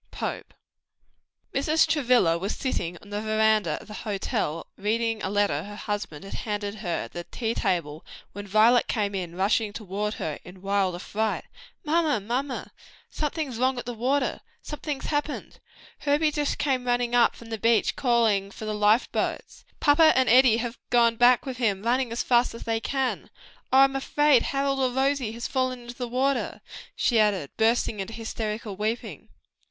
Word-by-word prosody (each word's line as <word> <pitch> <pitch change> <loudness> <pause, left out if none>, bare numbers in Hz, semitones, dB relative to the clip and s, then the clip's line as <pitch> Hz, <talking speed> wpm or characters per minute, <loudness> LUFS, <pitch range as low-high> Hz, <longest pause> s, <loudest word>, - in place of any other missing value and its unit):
POPE. - - -5 1.0
Mrs. 310 +4 +3
Travilla 250 - +3
was 190 +5 -3
sitting 175 -10 -3
on 205 - -15
the 205 +1 -2
veranda 215 -6 +2
of - - -14
the 210 - -9
hotel, 195 -6 -3
reading 225 +1 -1
a 190 - -2
letter 205 0 +1
her 205 +1 -9
husband 200 -6 -5
had 195 - -9
handed 205 -2 -3
her 180 -5 -2
at - - -10
the 175 0 -6
tea 230 -2 -3
table, 160 -7 -2 0.3
when 205 +1 -8
Violet 220 +4 +4
came 205 -2 -1 0.2
rushing 205 +3 +1
toward 210 0 -4
her 155 -2 -4
in 180 +1 -13
wild 195 -2 +1
affright. 210 +4 -2 0.4
"Mamma, 310 -5 +2
mamma, 250 +6 -3 0.4
something's 295 -5 -3
wrong! 260 0 +1 0.8
something's 300 -2 -5
happened! 295 0 -3 0.4
Herbie 300 +1 +2
just 295 -1 -1
came 260 -3 0
running 245 0 +1
up 245 -1 +4
from 230 -1 -13
the 225 - -3
beach, 230 +1 +2
calling 225 -6 +2
for 220 - -9
the 215 - -2
life 210 +3 +3
boat, - - -1 0.3
and - - -35
papa 315 +2 +5
and 260 -1 +3
Eddie 245 -1 +6
have 240 0 -4
gone 235 -1 +4
back 245 +1 +5
with 260 -2 -5
him 210 -5 0
running 245 +1 +1
as 235 - -1
fast 240 -1 +2
as - - -8
they 225 -1 -1
can. 265 +2 -2 0.4
Oh, 265 - +5
I'm 270 0 +4
afraid 285 -1 +3
Harold 275 0 0
or 260 -1 +2
Rosie 265 -2 0
has 235 +1 -6
fallen 255 -1 -1
into 240 0 -8
the 245 -1 -4
water!" 260 +3 -1 0.3
she 235 -3 +2
added 200 -9 +1
bursting 225 -1 +2
into 195 +3 -5
hysterical 220 -2 -4
weeping. 215 +4 -4
230 Hz, 170 wpm, -26 LUFS, 205-260 Hz, 1.0 s, Eddie